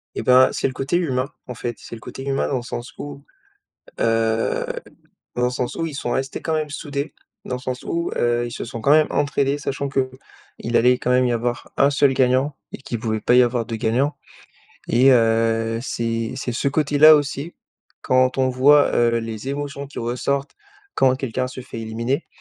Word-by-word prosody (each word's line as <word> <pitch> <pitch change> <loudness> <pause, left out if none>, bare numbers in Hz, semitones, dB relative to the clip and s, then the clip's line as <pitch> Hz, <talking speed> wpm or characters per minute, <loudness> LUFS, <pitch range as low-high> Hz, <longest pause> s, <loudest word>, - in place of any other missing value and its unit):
Et - - -3
ben, 130 +1 +6
c'est - - 0
le 130 - -5
côté 135 +6 -1
humain, 135 -6 -1 0.2
en 125 - -5
fait, 120 0 -4
c'est - - -10
le 110 - -12
côté 135 - -8
humain 135 0 0
dans 135 - -1
le - - -3
sens 120 0 -6
où, 140 -1 -8 0.8
heu, 115 0 +1 0.7
dans 125 - 0
le 125 - +2
sens 125 0 -3
où 165 - -1
ils 155 - -6
sont 120 - -3
restés 135 +1 -3
quand 160 - -1
même 155 -1 -1
soudés. 145 0 -4 0.3
Dans 125 - -2
le - - -9
sens 130 0 -4
où, 170 0 -2
heu, 120 0 +1
ils - - -6
se - - -5
sont 115 0 -7
quand 140 - +1
même 155 +1 +6
entraidés, 140 0 0
sachant 140 0 -3
qu'il 130 -3 -4
allait 125 +1 +4
quand 125 - -2
même 125 0 +4
y 120 - +1
avoir 120 +1 -3
1 140 - +4
seul 140 -1 +3
gagnant 130 +2 +2 0.2
et - - -6
qu'il 120 -3 -5
pouvait 110 -1 -2
pas 120 - +2
y 125 - +7
avoir 120 -1 0
2 115 - -4
gagnants, 125 +6 0 0.7
et 125 +4 +5
heu, 115 -1 +2
c'est 115 -1 -2
c'est 130 -2 -3
ce 130 +4 0
côté-là 150 +1 +6
aussi 145 +2 -3 0.5
quand 130 0 +2
on 130 -1 +3
voit, 140 +3 +5
heu, 115 0 +3
les 115 +1 -6
émotions 140 0 -4
qui 140 - -10
ressortent 125 +4 -2 0.4
quand 130 -1 +4
quelqu'un 130 -1 -2
se 130 - -8
fait 125 -2 -8
éliminer 115 +6 -2
130 Hz, 205 wpm, -22 LUFS, 120-140 Hz, 0.8 s, y